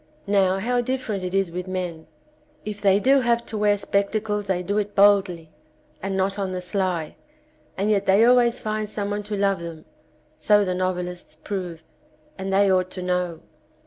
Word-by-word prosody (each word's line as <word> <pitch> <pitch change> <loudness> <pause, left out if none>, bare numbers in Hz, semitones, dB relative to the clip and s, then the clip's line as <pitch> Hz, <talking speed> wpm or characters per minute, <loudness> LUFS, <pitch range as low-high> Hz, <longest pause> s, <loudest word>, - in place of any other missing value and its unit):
Now 195 -2 +2
how 245 +5 0
different 240 -6 -3
it 180 +1 -3
is 195 -3 +1
with 180 +2 -5
men. 180 -3 -4 0.6
If 210 -1 -5
they 195 -1 +4
do 270 +5 +4
have 235 -2 +1
to 225 - -7
wear 205 -1 +3
spectacles 205 +1 -1
they 180 -1 0
do 200 +4 0
it 205 0 -4
boldly, 190 -5 +3 0.5
and 195 0 -2
not 195 +1 0
on 190 -2 -2
the 185 - -2
sly, 180 -3 -2 0.6
and 200 +3 +1
yet 200 -1 +1
they 200 +4 +5
always 245 -1 +4
find 215 -1 -3
some 205 -1 -3
one 205 0 -2
to 210 0 -5
love 195 -1 +1
them, 165 -2 -8 0.5
so 205 -1 +4
the 185 - -1
novelists 180 -2 -3
prove, 175 -1 -6 0.5
and 190 0 -4
they 200 +1 +4
ought 185 -1 +2
to 185 - -5
know. 180 -2 -1
195 Hz, 180 wpm, -23 LUFS, 180-210 Hz, 0.6 s, they